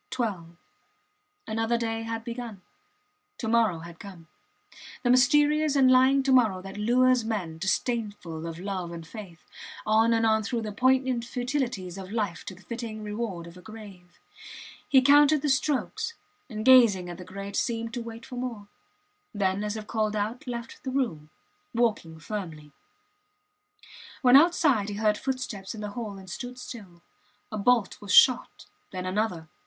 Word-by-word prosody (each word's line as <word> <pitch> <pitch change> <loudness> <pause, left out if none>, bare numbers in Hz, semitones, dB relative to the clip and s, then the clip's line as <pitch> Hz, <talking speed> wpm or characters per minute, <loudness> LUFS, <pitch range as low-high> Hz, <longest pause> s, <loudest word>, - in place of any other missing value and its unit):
Twelve. 190 -9 -4 0.9
Another 225 +2 0
day 225 -1 -2
had 225 0 -4
begun. 230 -5 -7 0.7
To 225 - -4
morrow 220 -7 +2
had 170 0 -11
come; 180 -6 -12 0.7
the 245 - +3
mysterious 295 +4 +4
and 260 -2 +5
lying 260 +2 +5
to 270 - +1
morrow 225 -8 +4
that 195 +1 -9
lures 245 +3 +3
men, 190 -8 -3
disdainful 190 -5 -2
of 165 -1 -6
love 185 -2 -4
and 165 -1 -8
faith, 180 -3 -11 0.4
on 220 +2 +4
and 225 0 +2
on 220 0 +3
through 225 +2 -3
the 215 - -4
poignant 255 +1 +2
futilities 240 -7 -3
of 190 0 -8
life 205 -7 -2
to 185 - -7
the 190 - -18
fitting 225 +1 -6
reward 210 -5 -4
of 170 +1 -12
a - - -12
grave. 200 -5 -13 0.7
He 265 -2 +6
counted 290 +1 +5
the 295 - +1
strokes, 280 - -1 0.3
and 215 -2 -5
gazing 230 -9 +6
at 175 0 -8
the - - -7
grate 200 +2 -7
seemed 230 +1 -2
to 240 - -3
wait 230 0 -9
for 250 - -8
more. 230 -5 -5 0.7
Then, 195 0 0
as 210 +1 -3
if 215 - -7
called 215 -1 -1
out, 215 +5 -3
left 235 -1 -6
the 265 - -3
room, 230 - -2 0.5
walking 215 -9 0
firmly. 160 -5 -7 1.5
When 250 0 +7
outside 285 - +4
he 205 - -4
heard 210 0 +1
footsteps 245 -7 -4
in 215 - -7
the 210 -1 -5
hall 210 -3 -6
and 190 -1 -12
stood 245 +6 -7
still. 195 -9 -10 0.5
A 215 - -4
bolt 230 -1 +2
was 200 -2 -6
shot 250 +5 +5 0.2
then 185 -1 -5
another. 185 -4 -2
220 Hz, 160 wpm, -27 LUFS, 190-245 Hz, 1.5 s, When